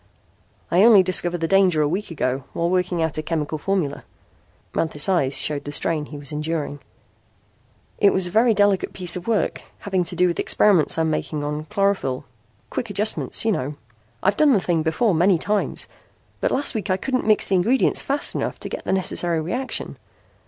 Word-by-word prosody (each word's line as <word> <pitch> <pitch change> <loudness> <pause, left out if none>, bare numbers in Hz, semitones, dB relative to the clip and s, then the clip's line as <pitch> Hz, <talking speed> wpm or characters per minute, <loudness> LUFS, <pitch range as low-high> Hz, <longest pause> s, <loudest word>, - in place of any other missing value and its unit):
'" - - -37
"I 175 - +4
only 215 -3 +7
discovered 175 -1 +1
the 165 - 0
danger 190 -3 +3
a - - +1
week 190 +7 -3
ago 135 -5 -2
while 170 +1 -1
working 180 -2 0
out 160 -1 -2
a - - 0
chemical 155 -1 -3
formula." 175 -5 -2 0.7
Manthis' 155 -3 0
eyes 140 -8 +1
showed 145 -2 -1
the 145 - -6
strain 150 0 -1
he 145 - -9
was 145 +1 -3
enduring. 150 -1 -3 1.2
"It 200 - +5
was 190 - +1
a 175 - -4
very 225 +2 +3
delicate 205 -1 +2
piece 180 -2 -1
of 180 +2 -7
work 225 -3 0 0.2
having 190 -3 -1
to - - -3
do 180 - +3
with 175 -1 -1
experiments 185 -9 +3
I - - +2
am 160 -1 0
making 155 -1 -3
on 150 +1 -4
chlorophyl 190 -8 -1 0.5
quick 235 - -4
adjustments, 210 +2 0
you 225 - +3
know. 145 -5 -3 0.5
I'd 195 +1 +2
done 300 -3 +5
the 210 - +3
thing 175 -3 0
before 165 +7 +1
many 175 +3 +3
times, 205 +5 -2 0.5
but - - 0
last 280 - -1
week 210 -2 -4
I 185 - +2
couldn't 255 +3 -2
mix 215 -1 +4
the - - 0
ingredients 235 +9 +2
fast 280 +1 +1
enough - - -3
to - - -5
get - - -6
the - - 0
necessary 175 -3 +1
reaction. 245 +12 -3
180 Hz, 195 wpm, -22 LUFS, 155-200 Hz, 1.2 s, only